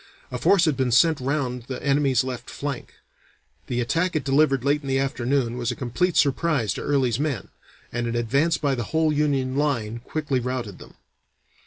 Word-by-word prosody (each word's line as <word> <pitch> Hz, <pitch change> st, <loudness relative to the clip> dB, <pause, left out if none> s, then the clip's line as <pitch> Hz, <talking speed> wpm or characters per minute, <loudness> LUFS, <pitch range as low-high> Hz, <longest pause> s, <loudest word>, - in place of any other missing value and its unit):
A -, -, -3 dB
force 190 Hz, -3 st, +4 dB
had 155 Hz, -4 st, +2 dB
been 130 Hz, -2 st, 0 dB
sent 160 Hz, +6 st, +4 dB
round 130 Hz, -3 st, -2 dB
the 130 Hz, -, -4 dB
enemy's 140 Hz, -3 st, +3 dB
left 130 Hz, -2 st, -6 dB
flank; 140 Hz, -3 st, -5 dB, 0.7 s
the 120 Hz, -, -2 dB
attack 165 Hz, +9 st, 0 dB
it 155 Hz, -, 0 dB
delivered 135 Hz, -2 st, +2 dB
late 145 Hz, +1 st, +2 dB
in 140 Hz, -, -9 dB
the 135 Hz, 0 st, +1 dB
afternoon 130 Hz, -2 st, 0 dB
was 120 Hz, -, -1 dB
a -, -, -2 dB
complete 155 Hz, +8 st, -1 dB
surprise 140 Hz, -, +2 dB
to -, -, -6 dB
Early's 130 Hz, -4 st, +1 dB
men, 145 Hz, -4 st, -2 dB, 0.4 s
and 120 Hz, 0 st, -2 dB
an 115 Hz, -, -2 dB
advance 135 Hz, +8 st, +1 dB
by 145 Hz, -2 st, 0 dB
the 120 Hz, -4 st, -2 dB
whole 160 Hz, -1 st, +3 dB
Union 140 Hz, -3 st, 0 dB
line 120 Hz, -6 st, -1 dB
quickly 145 Hz, +1 st, -2 dB
routed 125 Hz, -5 st, -4 dB
them. -, -, -14 dB
135 Hz, 185 wpm, -24 LUFS, 125-150 Hz, 0.7 s, force